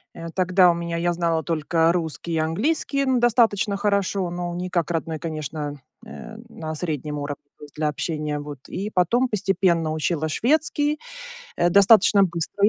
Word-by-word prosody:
Э, 165 0 -7
тогда, 185 0 +4
у - - 0
меня, 170 0 -4
я 175 +1 0
знала 165 -2 0
только 165 +1 +1
русский 170 -1 -3
и 160 - 0
английский, 270 - 0
н 260 -2 +2
достаточно 225 -4 +2
хорошо, 200 -2 0
но, 175 0 -4
не 180 +1 -4
как 170 -2 -1
родной, 160 -1 -3
конечно, 155 -2 -5 0.3
э, 220 - -10
на 160 -7 -6
среднем 150 -3 -3
уровне, 145 0 -5 0.2
то - - -15
есть, 145 - -13
для 150 0 -1
общения, 150 0 -3
вот. 145 -2 -8
И, 200 +3 -4
потом, 215 +7 +2
постепенно, 185 -5 +1
учила 155 0 -1
шведский, 295 - +1 0.6
э, 175 - +2
достаточно 200 +1 +6
быстро, 175 +3 -2
и - - +5
170 Hz, 170 wpm, -23 LUFS, 155-200 Hz, 0.6 s, достаточно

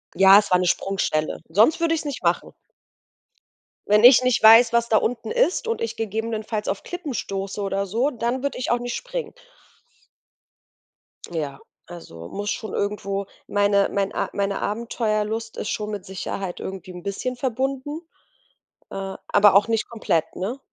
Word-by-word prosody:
Ja, 195 +1 +8
es 205 - -4
war 180 - +5
'ne 180 - 0
Sprungstelle, 170 -5 -1
sonst 220 - +4
würde 335 -1 +2
ich 315 - -3
es - - -13
nicht 285 -2 -5
machen. - - 0 1.3
Wenn 210 +2 +5
ich 255 0 +8
nicht 255 -2 +2
weiß, 225 +2 +8
was 235 0 +2
da 220 - +2
unten 230 +1 -2
ist 465 -1 +1
und 460 0 -2
ich 460 - -3
gegebenenfalls 220 0 -3
auf 195 - -3
Klippen 350 -6 -6
stoße 195 -2 -4
oder 195 0 -1
so, 235 +9 0
dann 240 +1 -2
würde 280 -1 -3
ich 250 - -2
auch 240 - +2
nicht 245 0 -4
springen. - - -5 2.0
Ja, 145 -4 -4 0.3
also, 85 - -10
muss 205 0 -3
schon 210 0 -5
irgendwo 200 -1 -2 0.2
meine 205 -1 +2
mein 200 0 -1
A - - -2
meine 200 0 -1
Abenteuerlust 220 0 -2
ist - - -4
schon 210 0 -3
mit 205 -3 -6
Sicherheit 190 -1 -5
irgendwie 190 -1 -7
'n 180 -1 -9
bisschen 225 +6 -3
verbunden, 270 +5 -2 0.9
äh, - - -7 0.3
aber 205 -1 +5
auch 200 +2 +5
nicht 225 -1 -1
komplett, 215 -8 -1
ne? 230 +9 -4
215 Hz, 165 wpm, -23 LUFS, 195-245 Hz, 2.0 s, Ja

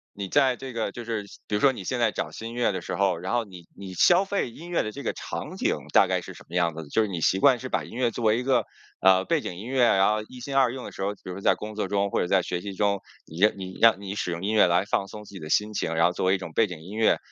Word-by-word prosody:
你 100 -1 -4
在 135 0 +3
这 130 +1 -8
个 115 -3 -2
就 120 - -7
是 115 -3 -3
像 100 - -14
比 105 - -1
如 105 - 0
说 140 - +6
你 115 -7 -8
现 125 +6 -2
在 115 -2 +3
找 - - -3
新 115 +1 -7
音 - - -8
乐 120 -2 +1
的 95 -2 -4
时 - - -4
候， 100 -3 +1
然 90 +5 -4
后 120 -1 +1
你 90 -4 -13
你 95 -1 -8
消 180 - +5
费 195 -10 -2
音 165 +8 -11
乐 175 - +1
的 110 - -4
这 - - -8
个 - - -1
场 - - -6
景 - - +1 0.2
大 - - +6
概 - - 0
是 - - -10
什 - - -14
么 85 - -9
样 85 -3 +1
子 80 - -6
的？ 75 - -14
就 110 - +2
是 110 - +1
你 90 -4 -4
习 95 +3 +2
惯 130 +1 +5
是 130 - -6
把 - - -1
音 - - -11
乐 120 -2 +1
作 120 - -5
为 110 +1 +4
一 125 - -2
个 125 -4 +2 0.4
呃， 95 0 +5
背 165 -3 +1
景 90 - -5
音 100 - -8
乐， 130 0 +1
然 95 -4 +4
后 105 0 0
一 130 - -11
心 135 +2 -5
二 130 -3 +4
用 130 0 -7
的 - - -7
时 - - -9
候， 100 +1 -1
比 - - -30
如 90 - -5
说 100 - -8
在 - - +4
工 110 0 -7
作 105 -2 -2
中 100 0 0
或 - - +1
者 - - -1
在 95 0 +3
学 90 0 -3
习 100 0 -6
中， 100 -1 +1 0.2
你 80 - -10
让 105 +2 +6
你 95 -1 -7
让 115 -3 +6
你 100 -1 -5
使 100 -3 -3
用 85 +1 -4
音 105 +2 0
乐 105 -4 +6
来 90 +2 +2
放 100 -1 -1
松 105 +1 -9
自 - - -14
己 95 - -8
的 75 -2 -8
心 105 +4 +1
情， 80 -5 -2
然 85 +1 +4
后 85 - +3
作 95 - -2
为 95 - +4
一 - - 0
种 90 -3 -8
背 115 - +3
景 90 -4 -8
音 95 +5 -10
乐， 110 0 +3
105 Hz, 375 characters per minute, -26 LUFS, 95-120 Hz, 0.4 s, 说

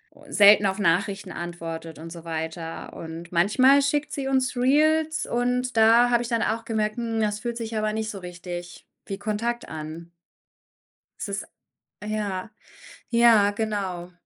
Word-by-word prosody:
u - - -18
selten 205 0 +7
auf 190 +2 -2
Nachrichten 195 +1 0
antwortet 165 -2 -6
und 165 +1 -8
so 170 -1 -9
weiter, 160 0 -5
und 165 +1 -8
manchmal 255 +11 +5
schickt 295 +2 0
sie 270 -2 -3
uns 260 -1 +1
Reels 310 +5 +2
und 250 +1 -1
da 230 +2 +6
habe 240 0 +3
ich 235 - -6
dann 230 -2 +1
auch 225 +1 -1
gemerkt, 215 -2 -1
hm, 230 -2 -2
es 210 0 -1
fühlt 235 -1 -3
sich 225 -1 -5
aber 215 0 0
nicht 220 0 -2
so 195 - -7
richtig 175 -1 -8 0.2
wie 195 0 -5
Kontakt 230 +3 -2
an. 160 +2 -7 1.1
Es - - -4
ist 200 0 -3 0.6
ja, 210 -1 -3 0.6
ja, 230 -4 +5
genau. 200 -5 -3
210 Hz, 155 wpm, -25 LUFS, 175-235 Hz, 1.1 s, selten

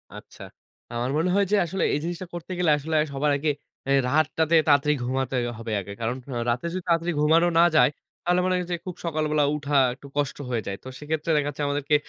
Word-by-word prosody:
আচ্ছা। - - -13 0.5
আমার 120 +2 -1
মনে 165 +4 +1
হয় 200 0 +3
যে 210 - +5
আসলে 185 +3 -2
এই 150 - +1
জিনিসটা 175 +2 -4
করতে 175 +1 -7
গেলে 170 -4 +3
আসলে 155 +2 -3
আ - - +3
সবার 145 +2 +1
আগে 150 +2 -1 0.4
এ - - +2 0.2
রাতটাতে 155 +3 +2
তাড়াতাড়ি 150 0 +4
ঘুমাতে 130 +1 -1 0.2
হবে 115 -1 -5
আগে। 100 - -9
কারণ 115 +2 -1 0.2
আ - - -1
রাতে 120 +6 -1
যদি 185 - -3
তাড়াতাড়ি 170 +1 +1
ঘুমানো 165 +3 +4
না - - +8
যায় - - +6 0.3
তাহলে 175 +1 +2
মনে 185 - +1
করেন 180 -1 -2
যে - - +1
খুব 180 -1 -5
সকালবেলা 155 -2 +1
উঠা 145 -1 -3 0.2
একটু 140 +2 -13
কষ্ট 145 -2 -1
হয়ে 115 -3 -1
যায়। 100 - -2
তো - - -10
সেক্ষেত্রে 155 +2 -2
দেখা 145 0 0
যাচ্ছে 145 +1 -4
আমাদেরকে 145 +1 +1
150 Hz, 220 wpm, -25 LUFS, 140-170 Hz, 0.5 s, না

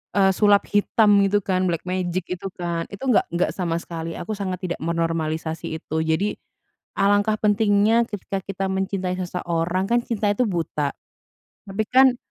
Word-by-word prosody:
eee, 195 -1 +5
sulap 205 +1 +4
hitam 205 0 +4
itu 200 +1 +2
kan, 185 -1 +1
black 170 -2 -1
magic 185 -1 -2
itu 180 +2 -4
kan. 170 -2 -3
Itu 250 +6 -2
nggak - - +3
nggak 175 - +1
sama 170 -3 -2
sekali 165 -1 -6
aku 215 -1 -5
sangat 185 -2 -3
tidak - - -3
menormalisasi 160 -1 -2
itu. 160 +1 -2
Jadi, 160 +6 +1 0.7
alangkah 205 +2 +3
pentingnya 210 +2 +3
ketika 200 -1 -4
kita 195 -1 -3
mencintai 190 -1 -1
seseorang 175 0 -1
kan 240 +1 +4
cinta 210 -3 0
itu 205 +5 +1
buta, 160 -5 -1 0.8
tapi 200 +3 -1
kan, 260 0 +5
190 Hz, 155 wpm, -23 LUFS, 170-205 Hz, 0.8 s, eee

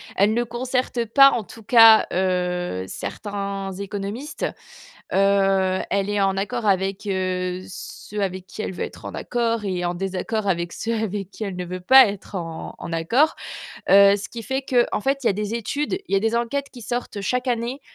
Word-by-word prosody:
elle 205 +3 +3
ne 240 - +1
concerte 245 0 -2
pas 275 +5 +7
en 235 - -1
tout 225 +3 -13
cas, 225 0 +7
heu, 180 - -1
certains 200 - -5
économistes. 200 +8 -4 0.7
Heu, 195 -1 +3
elle 200 0 0
est 205 0 0
en 195 -1 +2
accord 220 +4 -2
avec, 195 0 0
heu, 185 -2 -2
ceux 205 +2 -7
avec 185 -1 -4
qui 215 - -6
elle - - -4
veut - - -3
être - - -12
en - - -6
accord 230 -2 -1
et 180 -2 -2
en 175 - -1
désaccord 195 +3 -3
avec 170 -2 -1
ceux 230 0 -2
avec 205 -3 -3
qui 215 - -7
elle 195 -3 -4
ne 180 0 -4
veut 180 +1 -5
pas 260 +6 +8
être 200 0 -7
en 165 -3 -5
en - - -8
accord. 230 - +2 0.5
Heu, 200 0 +7
ce 205 +2 -6
qui 235 - -7
fait 265 +4 -3
qu'en 245 -4 +1
fait, 275 +4 0
il - - +3
y - - +5
a - - +1
des 210 +2 -3
études, 285 - -2
il - - -4
y - - +6
a - - +2
des 225 +2 0
enquêtes 275 +4 -2
qui 245 - -11
sortent 235 -2 -4
chaque 250 +6 -1
année 245 +3 -2
200 Hz, 200 wpm, -23 LUFS, 190-235 Hz, 0.7 s, pas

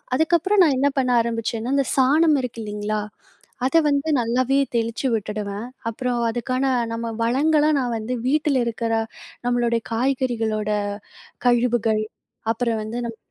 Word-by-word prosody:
அதுக்கப்பறம் 345 +6 +3
நான் 280 -5 +2
என்ன 285 - +3
பண்ண 255 - +1
ஆரம்பிச்சேன்னா, 230 +2 -2
இந்த 275 - +1
சாணம் 295 +3 +4
இருக்கு 230 -2 -5
இல்லிங்களா? 210 0 -2 0.7
அத 270 +5 +3
வந்து 285 +2 +1
நல்லாவே 250 +3 +1 0.2
தெளிச்சு 230 +3 -1
விட்டுடுவேன். 210 0 -3 0.2
அப்புறம் 245 +1 -2
அதுக்கான 255 +3 -2 0.3
நம்ம 230 0 -3
வளங்கள 295 +6 +3
நான் 245 -2 -1
வந்து 220 +3 -4
வீட்டுல 290 -2 +2
இருக்கிற, 230 0 -2 0.6
நம்மளுடைய 240 -1 +1
காய்கறிகளோட 230 -4 0 0.8
கழிவுகள், 235 -3 +2 0.5
அப்புறம் 230 -1 -1
வந்து, 220 +3 -5
நம் 230 -1 -6
240 Hz, 125 wpm, -22 LUFS, 225-270 Hz, 0.8 s, சாணம்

